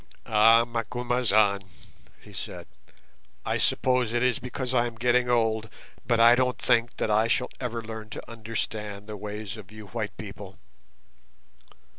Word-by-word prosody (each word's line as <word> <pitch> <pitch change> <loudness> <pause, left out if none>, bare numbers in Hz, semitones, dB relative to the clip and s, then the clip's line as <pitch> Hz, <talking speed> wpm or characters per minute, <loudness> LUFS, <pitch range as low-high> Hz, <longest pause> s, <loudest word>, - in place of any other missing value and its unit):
"Ah, 115 +2 +6
Macumazahn," 115 -3 +1 0.6
he - - -15
said, - - -6 0.8
"I - - 0
suppose 125 -3 +2
it 120 0 +1
is 125 -3 +2
because 125 0 -4
I 120 -1 +3
am 115 - -8
getting 125 +1 +2
old, 110 -2 +1 0.4
but 120 -2 +2
I 115 +1 +8
don't 125 0 +1
think 120 -1 +1
that 110 - 0
I 110 +2 +3
shall 125 +2 0
ever 120 -2 -3
learn 110 -1 -7
to - - -8
understand 110 -3 -5
the 105 0 -7
ways 105 +1 -6
of 105 -2 -12
you 110 0 -10
white 110 -2 -4
people. 100 -3 -9
115 Hz, 150 wpm, -27 LUFS, 110-120 Hz, 0.8 s, I